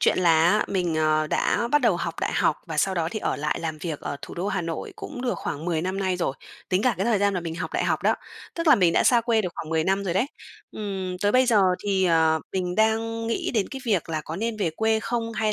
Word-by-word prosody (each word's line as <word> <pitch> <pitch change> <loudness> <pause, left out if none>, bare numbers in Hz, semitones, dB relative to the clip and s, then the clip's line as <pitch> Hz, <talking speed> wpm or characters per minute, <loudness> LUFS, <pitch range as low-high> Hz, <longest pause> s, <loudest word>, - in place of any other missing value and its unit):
Chuyện - - +3
là 165 -3 +4
á 210 +2 +2
mình, 180 -4 0
ờ, 155 0 +2
đã 235 +8 0
bắt 295 - +5
đầu 230 -8 +3
học 170 -1 -3
đại - - -1
học 150 - +2
và 160 -2 -5
sau 190 +5 +2
đó 165 -2 0
thì 215 - -3
ở - - -1
lại 150 +1 -1
làm 160 -2 -4
việc 155 -2 -4
ở - - -4
thủ - - -8
đô 180 +4 -2
Hà 190 -2 -1
Nội 165 -1 -5
cũng 245 - -7
được 250 -2 0
khoảng 150 +2 -4
10 165 -3 -1
năm 185 +2 -2
nay 190 -2 0
rồi, 170 -6 -1 0.3
tính 185 +1 +1
cả 250 -1 +3
cái 190 - -1
thời 230 -3 +3
gian 200 0 +2
mà 180 - -1
mình 165 -1 -5
học 170 - -5
đại - - 0
học - - 0
đó, - - +3 0.4
tức 335 0 -3
là 305 - +9
mình 180 -7 +3
đã - - +3
xa 240 -2 +5
quê 230 -1 +2
được 185 - -1
khoảng 160 - -6
10 160 -1 +1
năm 195 +2 +1
rồi 175 -3 -1
đấy, 195 +7 +2 0.5
ừm, 190 -3 -4
tới 205 0 +3
bây 255 0 +4
giờ 225 -4 +4 0.2
thì, 195 -2 +1
ờ, 160 -2 +3
mình 180 -2 -1
đang 225 +1 +1
nghĩ 230 - -1
đến 210 -4 +1
cái 270 - -7
việc 200 -9 0
là 160 -1 -2
có 160 - -5
nên 225 +3 -2
về 195 -6 0
quê 220 +6 +1
không, 230 0 -2
hay 215 -1 0
190 Hz, 280 wpm, -25 LUFS, 165-220 Hz, 0.5 s, là